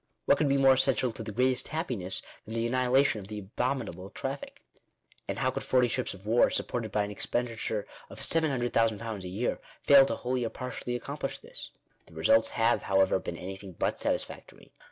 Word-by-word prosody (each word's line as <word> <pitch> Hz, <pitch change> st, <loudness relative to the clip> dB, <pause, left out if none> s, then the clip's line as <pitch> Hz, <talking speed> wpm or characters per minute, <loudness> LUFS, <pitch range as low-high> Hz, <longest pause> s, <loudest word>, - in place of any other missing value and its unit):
What -, -, +4 dB
could 145 Hz, -, +2 dB
be 140 Hz, -, +3 dB
more 135 Hz, -1 st, +6 dB
essential 130 Hz, -2 st, +2 dB
to 115 Hz, -, -8 dB
the 110 Hz, -1 st, -5 dB
"greatest 125 Hz, +4 st, +1 dB
happiness" 120 Hz, -, -2 dB, 0.2 s
than 110 Hz, -, -6 dB
the 115 Hz, 0 st, 0 dB
annihilation 130 Hz, 0 st, +3 dB
of 95 Hz, -, -10 dB
the 105 Hz, 0 st, -6 dB
abominable 100 Hz, -2 st, -3 dB
traffic? 135 Hz, +6 st, -6 dB, 0.6 s
And -, -, -3 dB
how -, -, +1 dB
could -, -, -4 dB
forty 125 Hz, -1 st, +3 dB
ships 110 Hz, -, -2 dB
of 95 Hz, +1 st, -16 dB
war, 115 Hz, +3 st, +4 dB
supported 115 Hz, -4 st, -2 dB
by 105 Hz, 0 st, +1 dB
an 100 Hz, -, -4 dB
expenditure 115 Hz, -1 st, -2 dB, 0.2 s
of -, -, -10 dB
£700,000 115 Hz, -, +1 dB
a -, -, -5 dB
year, 100 Hz, +7 st, -2 dB, 0.2 s
fail 140 Hz, -1 st, +8 dB
to -, -, -1 dB
wholly 125 Hz, 0 st, -2 dB
or 115 Hz, -, -1 dB
partially 125 Hz, 0 st, -5 dB
accomplish 120 Hz, -, -4 dB
this? -, -, -7 dB, 0.4 s
The 80 Hz, -, -17 dB
results 110 Hz, +8 st, +4 dB
have, 115 Hz, 0 st, +2 dB
however, 95 Hz, -1 st, +3 dB
been 85 Hz, -, -6 dB
anything 95 Hz, +1 st, -8 dB
but -, -, -1 dB
satisfactory. -, -, -4 dB
115 Hz, 185 wpm, -29 LUFS, 105-130 Hz, 0.6 s, fail